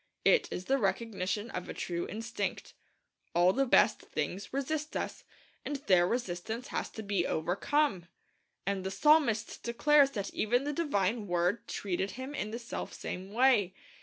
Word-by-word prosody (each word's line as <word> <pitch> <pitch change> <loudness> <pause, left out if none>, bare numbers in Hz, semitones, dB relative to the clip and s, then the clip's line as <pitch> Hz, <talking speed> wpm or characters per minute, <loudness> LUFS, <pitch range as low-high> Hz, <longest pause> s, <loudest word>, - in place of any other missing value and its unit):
It - - +5
is 180 - -5
the 270 +1 +2
recognition 205 0 -1
of 180 - -5
a - - -5
true 175 -1 -3
instinct. 225 +2 -4 0.6
All 175 +2 +5
the 270 0 +1
best 230 - +5
things 175 +6 -4
resist 300 +3 -2
us, - - -4 0.4
and 290 - -3
their 185 -10 +3
resistance 225 +2 -3
has - - -2
to 220 - -6
be 200 -4 0
overcome. 185 - 0 0.6
And 195 -1 -1
the 190 - -2
psalmist 235 -3 +3
declares 280 +4 +4
that 200 -1 -3
even 245 +4 +1
the 295 +1 -2
divine 225 - 0
Word 175 +6 0
treated 190 0 -2
him 260 +2 -6
in 215 -7 -3
the 225 - -4
selfsame 195 -5 -6
way. 225 -6 +3
215 Hz, 155 wpm, -31 LUFS, 185-260 Hz, 0.6 s, It